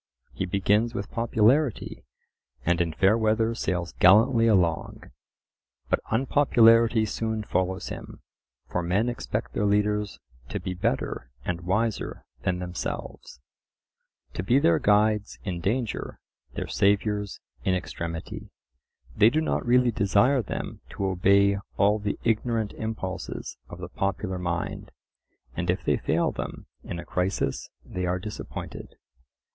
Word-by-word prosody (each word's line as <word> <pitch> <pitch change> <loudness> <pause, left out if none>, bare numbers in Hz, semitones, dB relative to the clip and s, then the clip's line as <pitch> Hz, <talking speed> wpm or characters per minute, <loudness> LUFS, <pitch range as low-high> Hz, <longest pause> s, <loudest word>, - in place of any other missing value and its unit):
He 95 - -3
begins 105 +5 +1
with 100 - -4
popularity, 115 +3 +1 0.6
and 85 +1 +2
in 85 -1 0
fair 95 +6 +3
weather 110 0 +2
sails 90 -6 -2
gallantly 115 +5 +6
along. 90 -7 +1 0.8
But - - +3
unpopularity 115 -3 +4
soon 110 0 -2
follows 95 -2 -1
him. - - -9 0.4
For 90 - -1
men 95 +7 +1
expect 120 - -4
their 105 - +1
leaders 105 0 +1 0.3
to - - -3
be 95 - -4
better 85 -7 -2 0.2
and 90 -1 -2
wiser 105 +5 -1 0.2
than 90 - 0
themselves: 90 -6 -6 0.9
to - - -3
be 120 +8 +3
their 85 - +4
guides 105 0 +2
in 90 -5 -3
danger, 115 +5 -2 0.4
their - - -3
saviours 105 0 +1 0.2
in 95 - +2
extremity; 85 -2 -5 0.7
they 105 - +6
do 150 - +1
not 160 - 0
really 125 0 +4
desire 110 +6 +3
them 105 - -5
to 100 - -2
obey 100 +2 +3 0.2
all 105 +2 +3
the 105 0 -2
ignorant 115 -1 0
impulses 110 -4 -5
of - - -8
the - - -6
popular 100 -1 -2
mind; 85 -1 -3 0.7
and 90 +1 -3
if 90 +2 0
they - - +2
fail - - +1
them - - -6 0.2
in - - -5
a 85 - -7
crisis 90 -6 -1 0.2
they 90 0 -3
are 90 +1 0
disappointed. 105 +3 -7
105 Hz, 130 wpm, -26 LUFS, 90-115 Hz, 0.9 s, gallantly